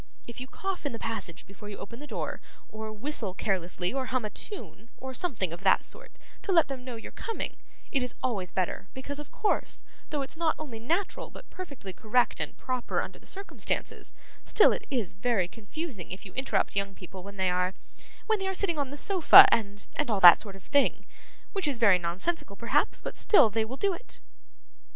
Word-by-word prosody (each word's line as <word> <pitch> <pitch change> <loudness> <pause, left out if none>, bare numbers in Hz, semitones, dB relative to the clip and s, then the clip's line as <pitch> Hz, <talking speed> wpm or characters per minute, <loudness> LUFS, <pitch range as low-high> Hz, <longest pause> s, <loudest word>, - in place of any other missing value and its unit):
If 235 - -9
you 255 - -5
cough 385 +6 -4
in 285 - -2
the - - -4
passage 225 -8 -5
before 200 +2 -11
you 205 - -7
open 230 +4 -8
the 295 - -9
door, - - -4 0.3
or 220 0 -6
whistle 215 -4 -3
carelessly, 180 -2 -1
or 265 -1 -2
hum 255 -3 -1
a 210 - -4
tune, 235 - -7
or 260 0 -6
something 235 - -1
of 170 - -8
that 190 -1 +4
sort, - - -7 0.3
to 400 - -2
let 330 -5 +5
them 265 -2 -5
know 250 -2 -6
you're 225 - -8
coming, 455 - -4 0.3
it's 250 -3 -1
always 200 -8 -1
better; 185 +1 -2
because, 280 +2 -4
of 295 - -8
course, 425 - -1 0.3
though 290 -2 -1
it's 270 - -9
not 320 -1 +1
only 265 -8 -7
natural 335 - -1
but - - -12
perfectly 280 - -8
correct 225 +5 +1
and - - -3
proper 255 -2 -2
under - - -5
the - - -12
circumstances, 395 +1 -3 0.3
still 425 - +6
it 440 - -3
is 235 -10 -1
very 200 -2 +1
confusing 225 - -7
if 185 - -7
you 190 - -10
interrupt 260 -5 0
young 200 -1 -1
people 185 0 -10
when 200 +2 -10
they 190 -1 +2
are 180 +1 0 0.5
when 440 -2 +2
they 385 - -2
are 385 - -1
sitting 340 -5 +1
on 280 -2 -1
the 285 - -6
sofa, 390 +4 +9
and 205 -2 0
and 295 - 0
all 210 -3 +2
that 175 -2 +11
sort 200 -3 -8
of 195 - -13
thing: 285 -1 +2 0.5
which 390 -6 +1
is 280 -4 0
very 200 -6 +5
nonsensical, 190 - -2
perhaps, 230 +3 +1
but - - -5
still 285 - +5
they 220 +1 +1
will 245 +5 -6
do 395 +3 +2
it. 475 - -5
240 Hz, 205 wpm, -29 LUFS, 200-295 Hz, 0.5 s, that